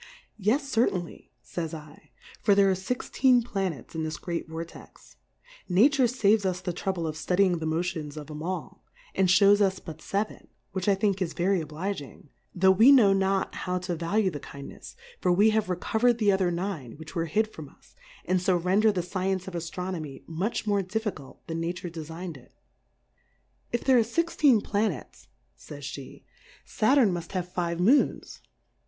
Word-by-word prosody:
Yes 245 +9 +1
certainly, 210 -9 -1
fays 165 -2 -5 0.4
/, - - -22
for 205 -2 +4
there 195 -1 +5
are - - +3
fixteen 245 +5 +1
Planets 190 - -4
in 160 -1 -3
this 155 0 -3
great 170 -2 -4
Vortex: 165 +1 -10 0.5
Nature 255 +9 +4
faves 220 -3 +3
us 185 -2 -1
the 180 -1 -4
trouble 180 -1 -2
of 155 -1 -3
ftudying^ 180 +2 +2
the 160 - -3
Motions 160 -2 -2
of 150 -2 -7
'em 150 0 -7
all, 185 +3 -5 0.3
and 190 - +2
fliows 200 +2 +5
US' 190 -1 +2
but 160 -3 -10
Seven, 200 +6 -3 0.2
which 190 -1 -3
I 200 - +4
think 195 -1 0
is 170 -3 -1
very 185 +1 +1
ob 155 - -8
liging, 155 -3 -6 0.3
tho' 190 +1 +5
we 225 +8 +7
know 225 -8 +7
not 195 0 0
how 180 0 -2
to 180 -1 -3
va 170 +4 -3
lue 200 -4 +3
the 145 - -6
Kindnefs, 140 0 -10 0.2
for 180 - +2
we 205 +5 +5
have 215 -1 +1
reco 185 +5 -2
verM 240 0 +4
the 210 -3 +3
other 190 -2 +2
Nine 170 - -4
which 155 +1 -11
were 165 -2 -1
hid^ 215 +5 0
from 150 -3 -9
us, - - -25 0.3
and 185 0 +1
fo 185 0 +2
render 190 +5 +3
the 180 -4 -2
Science 185 +1 -2
of 190 - -6
Aitronomy 170 -3 -5
much 185 +8 -3
more 205 -2 +2
Difficult 190 -8 -5
than 165 0 -4
Nature 175 +1 -4
defign'd 165 0 -7
it. 125 - -20 1.2
If 240 - -1
there 260 -2 +5
are - - +4
fixteen 285 -2 +2
VhnetSy 205 - -3 0.3
fays 145 - -10
JI;e^ 140 -2 -10 0.4
Saturn 250 -2 +3
muft 170 0 -6
have 180 -2 -2
five 170 -1 -2
Moons. 240 +11 +2
185 Hz, 180 wpm, -27 LUFS, 165-205 Hz, 1.2 s, we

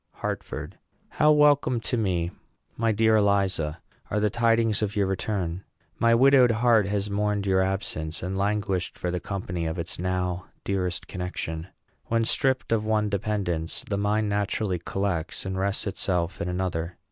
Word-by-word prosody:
HARTFORD. - - -5 0.3
How 150 - +4
welcome 145 -4 +4
to 115 - -1
me, 90 -6 0 0.4
my 115 0 +1
dear 110 +1 +4
Eliza, 95 -6 +1 0.3
are 105 - 0
the 105 -1 +1
tidings 115 -2 +2
of 105 0 -1
your 100 -1 +2
return! 95 -2 -2 0.4
My 115 0 +5
widowed 130 0 +6
heart 115 -2 +3
has 100 0 -1
mourned 105 0 0
your 95 -1 +3
absence, 85 -5 -2
and 95 +2 -2
languished 100 -2 -1
for 90 - -2
the 90 - -1
company 90 -4 -3
of 80 - -3
its 85 0 -4
now 90 0 -2 0.2
dearest 90 -3 -2
connection. 90 -3 -4 0.4
When 115 0 +1
stripped 130 +2 +1
of 110 -2 +2
one 110 -1 +1
dependence, 100 -5 -2
the 100 - -1
mind 105 +1 +1
naturally 100 -2 -1
collects 90 -2 -2
and 95 0 -3
rests 100 +1 0
itself 90 -3 -1
in 90 - -2
another. 90 -2 -2
100 Hz, 160 wpm, -26 LUFS, 90-110 Hz, 0.4 s, widowed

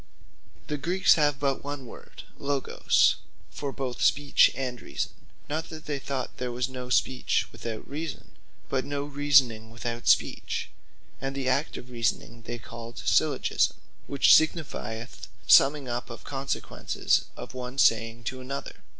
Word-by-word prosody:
The 150 -1 -3
Greeks 180 +6 +4
have 145 -3 +2
but 140 -2 0
one 145 -2 -5
word - - -12 0.2
Logos, 140 -1 +2 0.3
for 140 -1 -4
both 130 -3 -4
Speech 145 0 +5
and 125 -2 -4
Reason; 70 - -3 0.4
not 160 +2 -3
that 155 -1 -9
they 145 -2 -2
thought 135 -2 -4
there 125 -1 -3
was 125 +1 -1
no 125 -1 -7
Speech 125 +1 +1
without 115 -2 -6
Reason; 155 +1 -6 0.4
but 130 -1 0
no 140 0 -3
Reasoning 140 -6 +3
without 120 +1 -5
Speech: - - +1 0.5
And 135 0 -3
the 135 -2 -2
act 140 +4 +1
of 125 - -10
reasoning 115 0 -2
they 120 +1 -3
called 115 +1 -10
syllogisme; - - +2 0.3
which 140 -1 +5
signifieth 130 -8 0 0.2
summing 140 0 +6
up 120 +1 -3
of 115 - -9
the - - -11
consequences 135 0 -1
of - - -8
one 125 +1 -6
saying 115 -2 +3
to 130 +3 -4
another. 135 +2 -6
130 Hz, 150 wpm, -27 LUFS, 120-145 Hz, 0.5 s, summing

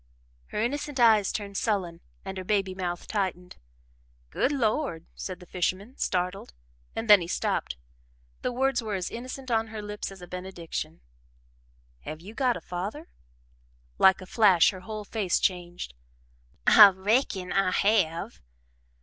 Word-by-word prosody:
Her - - -4
innocent 280 +4 -2
eyes 220 -4 +5
turned 200 -2 -4
sullen 180 -6 -1 0.2
and 190 0 -5
her - - -5
baby 195 -1 0
mouth 175 -2 -4
tightened. 185 -4 -3 0.7
"Good 265 - +1
Lord!" 225 - -1
said 185 -2 -6
the 180 - -13
fisherman, 185 +7 -2
startled, 180 - -2 0.4
and 225 0 -3
then 205 -3 +8
he 170 - -4
stopped - - -1 0.6
the - - -1
words 265 +1 +1
were 215 -3 -3
as 185 -2 -3
innocent 255 +2 -7
on 225 -1 +2
her 220 -1 -7
lips 210 -1 -5
as 195 - -11
a 180 - -9
benediction. 175 -3 -6 1.0
"Have 155 - -7
you 195 +6 -11
got 250 -1 +1
a - - -10
father?" 200 - -5 0.9
Like 190 0 +6
a - - -8
flash, 190 -4 +5
her 190 - -9
whole 210 +3 -7
face 205 -4 0
changed. 175 - -2 0.7
"I 205 -1 +10
reckon 190 -1 0
I 195 -1 +3
have." 185 -4 +1
195 Hz, 150 wpm, -27 LUFS, 180-225 Hz, 1.0 s, I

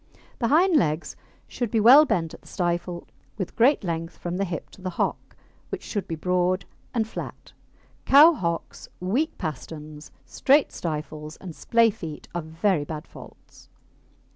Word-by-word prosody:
The 235 - +1
hind 330 +5 +4
legs 155 - 0 0.3
should 240 -3 -3
be 225 - +1
well 260 +8 +8
bent 165 - -1
at - - -12
the - - -20
stifle, 175 -1 -2 0.3
with 190 -4 -4
great 250 +3 +4
length 165 -1 -4
from 175 +1 -4
the 195 - 0
hip 170 -3 -6
to - - -16
the 185 - -3
hock, 175 - -3 0.3
which - - -5
should 200 -3 -4
be 165 - -3
broad 180 +3 0 0.3
and 225 -3 0
flat. - - -8 0.5
Cow 300 +5 +8
hocks, 170 - -4
weak 245 - -1
pasterns, 150 0 -7 0.2
straight 285 +2 +3
stifles, 155 -1 -5
and 175 -4 -9
splay 230 -1 +3
feet 165 -8 -8
are 175 - -2
very 160 +1 0
bad 150 0 -6
faults. - - -15
180 Hz, 160 wpm, -25 LUFS, 160-230 Hz, 0.5 s, well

